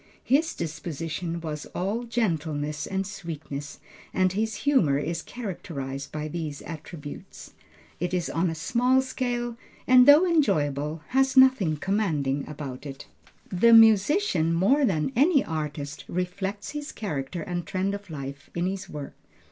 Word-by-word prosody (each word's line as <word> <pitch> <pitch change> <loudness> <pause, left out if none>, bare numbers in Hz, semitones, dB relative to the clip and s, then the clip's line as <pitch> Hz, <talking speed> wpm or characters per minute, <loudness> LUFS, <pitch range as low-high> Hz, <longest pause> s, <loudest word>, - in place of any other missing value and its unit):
His 300 +5 +2
disposition 165 +2 -4
was 155 -2 -5
all 205 +7 -1
gentleness 155 -10 -1
and 195 0 -2
sweetness, 160 -8 -7 0.4
and 185 -1 +2
his 220 +2 -1
humor 190 - +4
is 165 +3 -2
characterized 150 - -6
by 155 0 -4
these 155 -2 -5
attributes. 155 -2 -9 0.5
It 175 +1 -1
is 180 -2 -1
on 170 +2 0
a 165 - -3
small 250 +10 +2
scale, 240 -2 -3 0.3
and 250 0 +7
though 295 +5 +8
enjoyable, 155 - +1
has 265 +1 +2
nothing 260 -12 +5
commanding 150 -8 -1
about 140 -2 -7
it. 135 +1 -8 0.5
The 230 +6 +5
musician, 220 - +5
more 265 - +4
than 165 -2 0
any 285 +3 +4
artist, 150 -2 -4
reflects 190 +3 -3
his 295 0 -5
character 155 -4 -4
and 175 -1 -4
trend 190 +1 -1
of 200 -1 -7
life 140 -2 -7
in 175 +1 0
his 190 0 -3
work. 145 -2 -7
175 Hz, 140 wpm, -26 LUFS, 150-225 Hz, 0.5 s, though